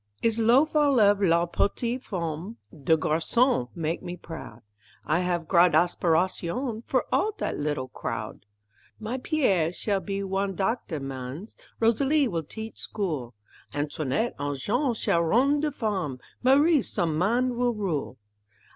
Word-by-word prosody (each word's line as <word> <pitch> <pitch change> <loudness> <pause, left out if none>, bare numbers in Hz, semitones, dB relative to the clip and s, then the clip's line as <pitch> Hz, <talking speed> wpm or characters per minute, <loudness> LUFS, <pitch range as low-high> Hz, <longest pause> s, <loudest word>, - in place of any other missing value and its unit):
I's 230 0 +2
lof' 255 +8 +4
all 290 -4 +4
of 205 -1 +4
la 170 -2 +3
petite 235 +8 -1
femme, 175 +3 -4 0.2
De 160 +1 +2
garçon 160 - +1
mak' 165 -1 -2
me 175 0 -6
proud, 160 -10 -10 0.4
I 155 +3 +2
haf 175 -2 -1
gr'ad 175 -1 +5
aspiratione 180 +7 +1
For - - +1
all 430 - +2
dat - - -3
little 145 -3 -2
crowd; 115 - -6 0.5
My 230 +4 -4
Pierre 200 - +1
shall 200 +2 -1
be 195 +2 -3
wan 195 0 -1
doctor 190 -4 -1
mans, 135 - -7 0.2
Rosalie 270 +6 +3
will 170 -7 -2
teach 220 +8 -8
school, 150 - -3 0.4
Antoine 150 - -1
an' 145 0 -2
Jeanne 240 - 0
shall 170 -5 +1
rone 260 - +3
de 300 0 0
farm, 200 - -2 0.2
Marie 285 +4 +5
som' 165 -7 -1
man 240 +9 +1
will 245 -1 +1
rule. 165 -11 -3
195 Hz, 140 wpm, -26 LUFS, 160-240 Hz, 0.5 s, gr'ad